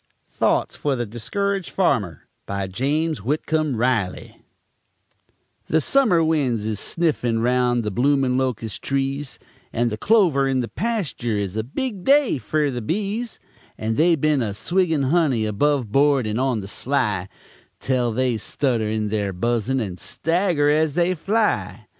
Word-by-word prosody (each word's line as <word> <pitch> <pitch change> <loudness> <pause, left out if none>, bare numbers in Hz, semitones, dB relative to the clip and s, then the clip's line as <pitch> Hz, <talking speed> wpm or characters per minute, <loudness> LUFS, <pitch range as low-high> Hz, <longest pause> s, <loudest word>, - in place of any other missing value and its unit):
THOUGHTS - - 0
FER 145 -2 0
THE 120 -1 -2
DISCURAGED 195 - -3
FARMER 110 - 0 0.2
BY 100 -1 -2
JAMES 150 - -1
WHITCOMB 150 +2 -1
RILEY 115 -6 -1 1.3
The 160 - +3
summer 195 - +3
winds 135 -9 0
is 110 -2 -2
sniffin' 145 -9 0
round 120 0 +2
the 105 - -2
bloomin' 135 +3 +2
locus' 125 -5 -2
trees; 135 +1 -2 0.3
And 120 0 0
the 105 - -4
clover 175 - +3
in 130 -1 +1
the 120 - -3
pastur 145 - -2
is 100 -1 -3
a 110 - -1
big 200 - -4
day 275 - +4
fer 145 +6 0
the 120 -1 -4
bees, 210 - -3 0.4
And 110 +1 -2
they 165 +4 +4
been 150 -2 +1
a 105 -4 -2
swiggin' 160 - +1
honey, 145 -10 +2
above 125 +2 0
board 140 -1 +3
and 110 +2 -2
on 130 -4 0
the 95 - -8
sly, 105 -6 -1 0.5
Tel 125 -3 0
they 125 0 0
stutter 115 0 -1
in 110 -1 -2
theyr 100 -3 -1
buzzin' 120 +6 0
and 95 -6 -4
stagger 165 -3 0
as 155 -1 +1
they 175 +1 +2
fly. 210 +6 -1
135 Hz, 150 wpm, -22 LUFS, 110-160 Hz, 1.3 s, day